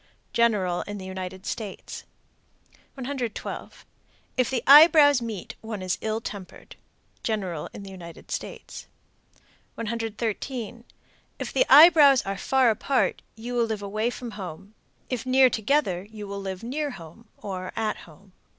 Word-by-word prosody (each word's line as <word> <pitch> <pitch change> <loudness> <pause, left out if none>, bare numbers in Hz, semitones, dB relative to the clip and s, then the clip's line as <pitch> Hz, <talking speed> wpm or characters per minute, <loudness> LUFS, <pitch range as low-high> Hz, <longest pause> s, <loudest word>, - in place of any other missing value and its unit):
General 205 -7 +2
in 205 0 -5
the 190 - -8
United 190 0 -7
States. 210 -4 -6 0.9
112. 255 -4 -5 0.5
If 255 -2 +1
the 250 -3 -1
eyebrows 290 -2 +8
meet, 220 -6 -6
one 220 -3 -6
is 185 -1 -2
ill 220 0 -1
tempered. 200 -4 -9 0.5
General 190 -8 -3
in 200 - -9
the 195 - -9
United 170 -3 -11
States. - - -6 0.9
113. 230 +1 -4 0.5
If - - -5
the - - +3
eyebrows 295 -3 +8
are 195 0 -3
far 260 +3 +3
apart, 260 +5 0
you 235 +3 -7
will 240 -1 +2
live 220 -2 -4
away 215 +3 -1
from 245 -1 -7
home; 195 0 -9 0.3
if 250 -3 -3
near 260 0 +5
together, 220 -6 0
you 210 -2 -8
will 200 0 -5
live 190 +1 -6
near 290 +5 -2
home, 190 - -12
or 185 -2 -6
at 220 -1 -1
home. 185 +4 -16
220 Hz, 140 wpm, -25 LUFS, 195-250 Hz, 0.9 s, eyebrows